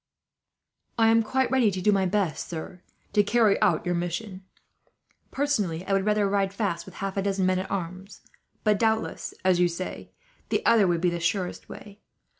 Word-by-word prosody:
"I 225 -1 +4
am 225 0 +5
quite 260 +3 0
ready 255 -5 +4
to 190 -2 -3
do 210 +3 +3
my 195 -2 +2
best, 190 -4 -1
sir, 175 +2 -7 0.3
to 205 - +5
carry 210 0 +2
out - - +2
your 175 - 0
mission. 180 +3 -4 0.9
Personally 205 - -1
I 195 - -1
would 195 +1 +1
rather 210 -1 +2
ride 195 0 0
fast, 200 -6 -2
with 190 - -12
half 195 0 -4
a - - +2
dozen 195 -1 0
men 185 0 +2
at 190 - -5
arms; 185 +2 -5 0.4
but 210 -2 +2
doubtless, 220 -1 -1
as 185 -2 +4
you 180 - +4
say, 175 +2 -6 0.4
the - - -1
other 220 -4 +5
would 170 -2 0
be 175 -1 +2
the 170 - -3
surest 180 +2 -2
way. 205 0 -11
195 Hz, 190 wpm, -26 LUFS, 180-210 Hz, 0.9 s, am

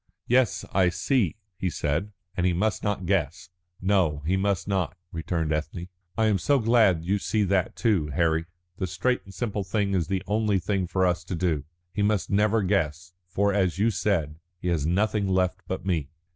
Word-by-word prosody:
"Yes, 125 -1 +2
I 95 -2 +4
see," 95 - +1 0.2
he 95 - 0
said. 80 +6 -1 0.2
"And 90 0 +1
he 90 - +2
must 105 +5 0
not 105 -3 -1
guess." 85 -2 -1 0.3
"No, 90 -7 +1
he 90 +4 +2
must 95 -1 0
not," 95 -3 -1
returned 80 -1 -1
Ethne. 80 +4 -4 0.3
"I 110 - +3
am 105 -3 +2
so 140 - +3
glad 110 -8 +3
you 100 +3 +1
see 105 +2 0
that 95 -1 +1
too, 100 -10 +1
Harry. 80 +2 +1 0.3
The 95 - -2
straight 125 +8 0
and 95 - -12
simple 100 +1 -2
thing 100 0 0
is 85 -4 +1
the 95 0 -1
only 105 -1 +1
thing 95 0 -1
for 95 +2 +1
us 90 0 +1
to 90 - -3
do. 80 -4 0 0.3
He 105 - -1
must 105 -1 +1
never 105 +2 +3
guess, 85 -3 -1
for, 100 +3 +1
as 95 -4 +1
you 110 +3 +3
said, 85 -7 -1 0.2
he 90 - -2
has 80 -4 0
nothing 100 +3 +1
left 95 -1 +1
but 95 0 -4
me." 80 -7 0
95 Hz, 190 wpm, -26 LUFS, 85-105 Hz, 0.3 s, I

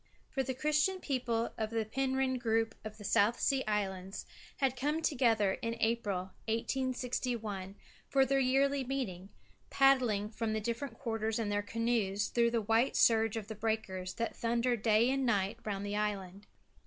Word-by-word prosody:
For 270 - 0
the 260 0 -3
Christian 305 +7 +1
people 245 -7 -1
of 220 -1 -1
the 225 -1 -1
Penrhyn 265 +2 0
group 225 -1 +1
of 215 0 -7
South 210 +4 +3
Sea 270 -1 +2
Islands 195 -2 -2 0.3
had 265 -2 +1
come 295 +5 -1
together 225 -9 +2
in 230 0 -2
April, 205 -5 0 0.2
1861, 230 -4 -2 0.3
for 270 -1 +4
their 275 +1 +2
yearly 270 +1 +2
meeting, 225 -9 -4 0.4
paddling 250 -7 +3
from 225 -1 -2
the 220 - 0
different 235 +3 -4
quarters 225 -3 -2
in 225 -3 -1
their 205 0 +1
canoes 210 -2 0
through 235 -1 +3
the 230 -1 0
white 225 +5 +2
surge 225 -1 +4
of 215 -2 -5
the 220 - -5
breakers 195 -4 -3
that 230 - -2
thunder 235 +1 +1
day 220 +1 +3
and 270 0 0
night 200 -6 +1
round 200 -1 -3
the 205 0 -3
island. 200 -2 -3
230 Hz, 160 wpm, -33 LUFS, 210-255 Hz, 0.4 s, for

